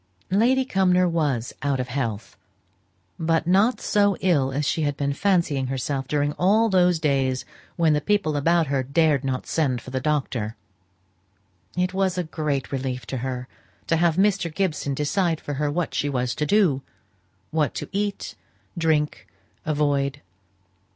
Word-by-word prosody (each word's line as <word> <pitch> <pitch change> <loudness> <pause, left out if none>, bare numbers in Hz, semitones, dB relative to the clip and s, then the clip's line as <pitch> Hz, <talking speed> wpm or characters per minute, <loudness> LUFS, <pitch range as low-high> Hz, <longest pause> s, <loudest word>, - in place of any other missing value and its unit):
Lady 250 +7 +3
Cumnor 185 -4 +3
was 145 -8 -1
out 140 -1 0
of 125 0 -3
health; 115 -5 -3 0.8
but 165 0 +1
not 200 +8 +3
so 205 -1 +2
ill 145 -8 +2
as 140 +2 -1
she 160 - 0
had 145 -2 -1
been 140 0 0
fancying 165 -7 +1
herself 135 +1 -2
during 145 0 0
all 215 +5 +4
those 180 -3 +4
days 135 -4 0 0.3
when 165 -3 +3
the 150 - +1
people 175 -3 +1
about 165 +3 +3
her 140 -2 0
dared 140 +1 +2
not 130 -1 -2
send 135 -6 0
for 130 - -11
the 130 - -1
doctor. 130 -6 -1 1.2
It 180 +1 0
was 190 -1 0
a 180 - 0
great 150 -4 -3
relief 130 -3 -3
to 130 - -4
her 125 0 -4 0.4
to 165 - +1
have 170 -1 +3
Mr. 190 -3 +2
Gibson 150 -5 -1
to 150 - -1
decide 170 0 +1
for 145 - -5
her 150 - +1
what 165 +1 -2
she 145 - 0
was 125 -2 -1
to 150 - -2
do; 175 -8 +3 0.7
what 150 -5 0
to - - -4
eat, 205 0 -2 0.4
drink, 160 -3 0 0.4
avoid. 145 -2 0
150 Hz, 160 wpm, -24 LUFS, 135-180 Hz, 1.2 s, all